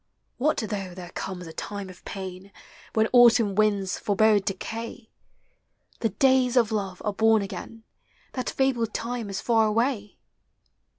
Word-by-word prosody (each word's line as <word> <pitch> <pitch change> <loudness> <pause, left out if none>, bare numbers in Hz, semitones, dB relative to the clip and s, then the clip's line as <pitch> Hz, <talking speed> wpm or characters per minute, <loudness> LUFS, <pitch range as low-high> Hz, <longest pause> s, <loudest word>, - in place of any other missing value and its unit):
What 300 +5 +2
though 200 -5 -4
there 175 -2 -9
comes 185 -2 -5
a 160 - -9
time 200 +2 -5
of 185 -1 -13
pain 190 0 -7 0.4
When 220 0 +3
autumn 235 -4 +6
winds 200 -2 +1
forebode 210 0 +3
decay? 225 +3 -5 0.9
The 225 - +1
days 260 +3 +3
of 230 -3 +4
love 195 -4 -3
are 210 - 0
born 220 0 +4
again: 225 +3 -8 0.5
That 255 -2 -2
fabled 245 -5 0
time 235 -2 -3
is 195 -1 -4
far 225 -2 +3
away! 220 -1 -1
215 Hz, 140 wpm, -26 LUFS, 195-230 Hz, 0.9 s, autumn